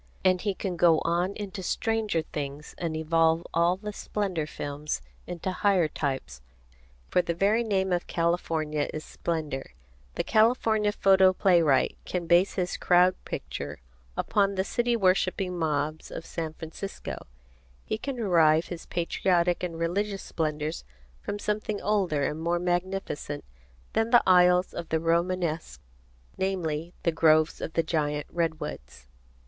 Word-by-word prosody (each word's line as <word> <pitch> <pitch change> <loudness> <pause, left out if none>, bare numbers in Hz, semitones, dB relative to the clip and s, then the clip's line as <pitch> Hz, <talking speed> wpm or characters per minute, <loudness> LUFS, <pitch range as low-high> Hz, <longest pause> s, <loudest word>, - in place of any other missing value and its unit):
And 185 -1 +4
he 200 -2 -1
can 185 -3 -3
go 165 -1 +5
on 175 +3 0
into 200 -2 -6
stranger 215 -3 0
things 145 -1 -6
and 165 -2 -2
evolve 165 +1 +2
all 170 +2 +3
the 210 +1 -6
Splendor 190 -8 -2
Films 145 0 -4 0.3
into 175 +2 -3
higher 185 -3 +2
types, 135 - -4 0.7
for 180 - +4
the 170 - -3
very 210 +6 +2
name 190 -4 0
of 175 - -1
California 160 -3 0
is 155 - -6
splendor. 150 - -4 0.4
The - - 0
California 220 -2 +3
photo 190 -2 +5
playwright 170 -7 +3
can 180 -2 -3
base 175 +3 +4
his 180 -2 -1
Crowd 180 +1 +4
Picture - - -5 0.4
upon 200 -1 +1
the 190 - +1
city 240 +4 0
worshipping 185 -2 +1
mobs 155 0 -1
of 165 - -7
San 160 -2 -4
Francisco. 165 +5 -7 0.6
He 215 - -2
can 275 +3 -4
derive 165 -8 +3
his 175 -2 -7
Patriotic 175 0 +1
and 170 -2 -4
Religious 195 +4 -1
Splendors 155 -1 -3 0.4
from 205 - -4
something 210 0 -2
older 190 -9 +1
and 150 +3 -2
more 170 +1 +1
magnificent 175 -4 -2 0.5
than 225 +1 +1
the 240 0 +6
aisles 180 0 +5
of 165 - -6
the 160 - +1
Romanesque, 165 - 0 0.6
namely: 175 -3 -2
the 170 - +2
groves 155 -1 +3
of 160 - -4
the 165 - +2
giant 150 -2 -1
redwoods. 150 - -4
175 Hz, 140 wpm, -27 LUFS, 160-195 Hz, 0.7 s, the